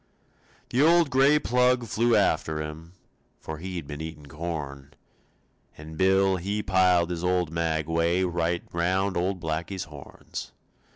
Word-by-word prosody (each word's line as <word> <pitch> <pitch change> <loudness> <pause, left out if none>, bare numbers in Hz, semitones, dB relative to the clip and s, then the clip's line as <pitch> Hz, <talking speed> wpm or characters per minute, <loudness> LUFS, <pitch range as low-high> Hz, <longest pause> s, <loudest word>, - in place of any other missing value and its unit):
The 125 - +2
old 165 -1 +5
gray 135 +3 +5
plug 125 -2 +2
flew 115 +3 +2
after 80 -6 +1
him, 80 +2 -7 0.5
For 80 -1 -7
he'd 90 -2 -5
been 75 +1 -7
eatin' 80 -2 -7
corn; 70 -3 -6 0.8
And 80 +1 -10
Bill, 95 +2 +3
he 100 +4 -2
piled 90 -2 +3
his 85 -1 -4
old 90 -3 +1
maguey 85 +2 0
Right 85 -1 -1
round 95 +3 0
old 90 +2 -1
Blackie's 85 +3 -3
horns. 75 -3 -9
85 Hz, 130 wpm, -26 LUFS, 80-95 Hz, 0.8 s, old